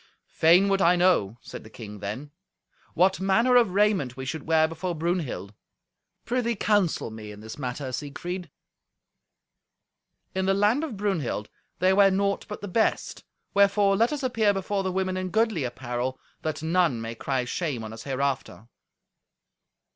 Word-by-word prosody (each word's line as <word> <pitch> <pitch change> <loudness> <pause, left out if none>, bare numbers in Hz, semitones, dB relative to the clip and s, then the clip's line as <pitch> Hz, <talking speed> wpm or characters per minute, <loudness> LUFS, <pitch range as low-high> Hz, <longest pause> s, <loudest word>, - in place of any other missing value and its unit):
"Fain 175 +5 +5
would 195 -1 +2
I 175 0 +5
know," 175 - +2
said - - -9
the 110 - -13
king 105 -2 -9
then, 110 +9 -6 0.6
"what 185 +3 +3
manner 225 +7 +3
of 230 -7 +4
raiment 195 - +2
we 130 - -5
should 155 +2 -5
wear 160 -1 +4
before 170 +2 -4
Brunhild. 155 - -2 0.7
Prithee, 235 -1 0
counsel 200 - +1
me 110 -1 -8
in 105 0 -11
this 110 +5 -9
matter, 130 0 -4
Siegfried." 175 +6 -5 1.8
"In 190 0 -1
the 195 - +3
land 210 +9 +2
of 270 -10 -5
Brunhild 170 - -2 0.3
they 185 +1 +3
wear 200 0 +6
naught 200 +1 0
but 210 - -6
the 205 - -5
best, 220 +4 0 0.3
wherefore 200 0 +4
let 230 +6 +2
us 295 -2 -3
appear 225 -5 +2
before 195 +1 -1
the 190 -1 -2
women 185 0 -1
in 185 0 -3
goodly 220 -6 +1
apparel, 125 +1 -3 0.2
that 155 0 -3
none 165 -6 +2
may 115 0 -5
cry 130 +2 -2
shame 135 -3 -3
on 110 0 -7
us 115 - -9
hereafter." 130 -6 -3
175 Hz, 160 wpm, -26 LUFS, 130-200 Hz, 1.8 s, wear